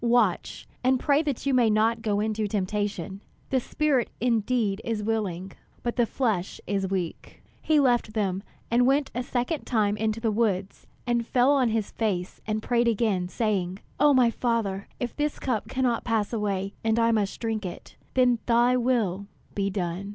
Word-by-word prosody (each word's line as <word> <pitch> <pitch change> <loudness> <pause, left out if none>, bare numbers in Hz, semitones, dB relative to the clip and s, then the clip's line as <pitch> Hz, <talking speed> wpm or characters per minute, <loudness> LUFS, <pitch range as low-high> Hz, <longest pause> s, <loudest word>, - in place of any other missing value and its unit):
Watch 235 -6 +1 0.2
and 255 0 +3
pray 285 +2 +3
that 285 -5 -3
you 275 - +2
may 245 -3 +4
not 220 +2 +2
go 210 -2 0
into 215 0 -1
temptation. 200 -1 -2 0.3
The 265 - +3
spirit 275 -1 0
indeed 225 -3 +1
is 225 -2 -2
willing, 195 -4 -2 0.3
but 240 - -2
the 240 -2 +2
flesh 215 -9 -1
is 195 -2 -1
weak." 185 -4 -4 0.2
He 310 -1 +3
left 240 -5 +2
them, 195 -3 0 0.3
and 245 +1 +4
went 275 +1 +2
a 245 - -1
second 250 +4 -2
time 210 -4 +1
into 220 +1 -1
the 225 -1 0
woods, 200 -3 -1 0.2
and 240 -1 +1
fell 250 +2 +4
on 265 -4 +3
his 220 -2 -1
face, 190 -5 -2
and 215 0 -1
prayed 240 -1 +2
again, 210 -5 +1
saying: 190 -3 -1 0.2
"O 295 +1 +6
my 250 -4 +5
Father, 225 -6 -1
if 245 -2 -3
this 295 0 -1
cup 240 -6 -2
cannot 250 -3 0
pass 225 -2 0
away, 200 -3 -1
and 225 0 +2
I 230 0 +4
must 210 -3 0
drink 225 -2 -2
it, 180 - -8 0.2
then 250 -2 +4
thy 240 +1 +4
will 220 -6 0 0.3
be 200 -1 0
done." 185 0 -3
225 Hz, 175 wpm, -26 LUFS, 200-245 Hz, 0.3 s, O